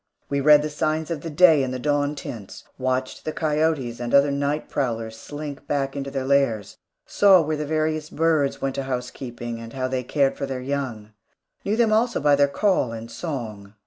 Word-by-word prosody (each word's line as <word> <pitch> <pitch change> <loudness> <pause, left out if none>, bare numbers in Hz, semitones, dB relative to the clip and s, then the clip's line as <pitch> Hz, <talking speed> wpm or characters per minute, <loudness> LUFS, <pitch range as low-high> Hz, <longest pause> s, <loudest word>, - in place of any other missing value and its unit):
We 140 0 0
read 150 +1 +6
the 155 - -2
signs 155 +2 -1
of 160 -4 -3
the 165 - -5
day 160 -1 +6
in 130 - -1
the 130 - -3
dawn 145 +2 0
tints; 110 -7 -8 0.2
watched 130 0 -2
the 155 - -3
coyotes 150 -6 0
and 120 +1 0
other 140 +1 +5
night 140 +2 -1
prowlers 115 -5 -2
slink 145 +3 -8
back 135 -2 0
to 140 - -5
their 135 -1 -3
lairs; 135 -7 +1 0.3
saw 195 -2 +5
where 155 +1 -1
the 150 0 -3
various 155 0 -1
birds 155 -3 +1
went 135 -1 -2
to 135 - -3
housekeeping, 125 -2 -5
and 115 0 -9
how 130 -1 -2
they 130 0 -2
cared 135 +2 +1
for 140 - -3
their 135 -1 -4
young; 125 -5 -4 0.5
knew 210 +2 0
them 230 -2 +3
also 235 +2 +2
by 145 0 +4
their 140 0 +4
call 160 - +1
and 115 0 -7
song. 110 - -6
140 Hz, 200 wpm, -23 LUFS, 125-155 Hz, 0.5 s, read